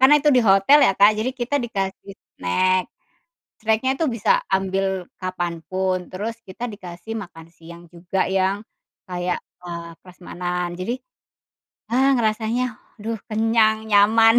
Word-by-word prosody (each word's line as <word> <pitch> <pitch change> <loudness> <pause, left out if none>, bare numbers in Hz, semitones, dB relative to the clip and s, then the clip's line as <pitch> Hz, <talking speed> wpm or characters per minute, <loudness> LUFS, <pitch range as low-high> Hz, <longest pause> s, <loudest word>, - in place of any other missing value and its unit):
karena 270 +3 +8
itu 295 0 +3
di 250 - +5
hotel 210 +7 +6
ya 245 -8 +5
Kak, 205 +2 +7
jadi 215 +4 -1
kita 260 +3 -1
dikasih 195 -3 -4 0.2
snack, 185 - +2 0.7
snack-nya 220 +3 +1
itu 325 - +1
bisa 215 - +3 0.2
ambil 190 -1 -1
kapanpun, 185 0 -2
terus 220 +5 -5
kita 230 +5 -5
dikasih 200 +3 -7
makan 165 -5 -10
siang 170 +1 -13
juga 180 +3 -2
yang 195 +2 +1 0.5
kayak, 180 0 -2 0.2
eee, 170 -1 -6
prasmanan, 180 -1 -5
jadi, 230 +7 -2 1.0
eee, 265 +3 +4
rasanya 220 +3 0 0.3
aduh 225 +2 -4
kenyang, 220 0 +2
nyaman, 225 +3 +6
195 Hz, 130 wpm, -22 LUFS, 180-225 Hz, 1.0 s, karena